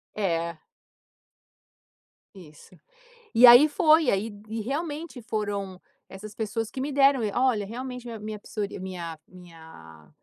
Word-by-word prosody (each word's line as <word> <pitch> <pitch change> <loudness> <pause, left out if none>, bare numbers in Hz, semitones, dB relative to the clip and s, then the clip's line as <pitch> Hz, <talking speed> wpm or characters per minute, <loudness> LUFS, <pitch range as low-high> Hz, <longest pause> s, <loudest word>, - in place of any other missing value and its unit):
É. 170 -5 -2 1.7
Isso. 155 -5 -16 0.6
E 245 +2 +8
aí, 245 +6 +9
foi. 310 +2 +4
E - - +2
aí 205 +3 -1 0.2
e 225 0 -4
realmente, 295 +3 -5
foram 205 -4 -4 0.3
essas 205 +2 -10
pessoas 225 0 -4
que 260 - -7
me 285 +2 -3
deram 275 -2 +4
e 210 - -1
"Olha, 245 -6 +1
realmente, 250 +2 -7
min 235 - -7
a 225 - -7
minha 215 0 -6
psorí 205 -1 -6
minha 175 -4 -7
minha 160 - -15
215 Hz, 140 wpm, -26 LUFS, 185-250 Hz, 1.7 s, aí